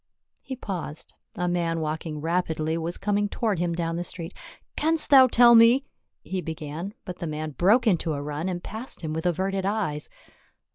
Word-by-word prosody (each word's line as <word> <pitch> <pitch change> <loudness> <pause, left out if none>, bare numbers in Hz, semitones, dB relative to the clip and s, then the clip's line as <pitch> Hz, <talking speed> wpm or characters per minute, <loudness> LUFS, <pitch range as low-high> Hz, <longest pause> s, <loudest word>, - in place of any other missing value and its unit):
He 265 - -6
paused, 180 - -6 0.2
a 180 - -1
man 170 -2 0
walking 155 -1 -4
rapidly 160 -1 -1
was 165 +1 -2
coming 205 0 0
toward 215 -6 -1
him 175 -1 0
down 165 -1 -2
the 175 - -2
street. 175 0 -6 0.2
" - - -40
Canst 315 0 +2
thou 265 -2 +9
tell 240 0 +7
me 235 +4 +6
— - - -52
" - - -59
he 185 -1 -3
began, 160 +4 -6
but 180 -3 -7
the 170 - -4
man 155 0 -4
broke 205 - +3
into 175 -6 +2
a 140 - -3
run, 150 +5 -3
and 175 -1 -4
passed 225 0 -6
him 155 -2 -4
with 160 +2 -2
averted 190 +2 -1
eyes. 195 -7 -2
175 Hz, 195 wpm, -25 LUFS, 160-205 Hz, 0.2 s, thou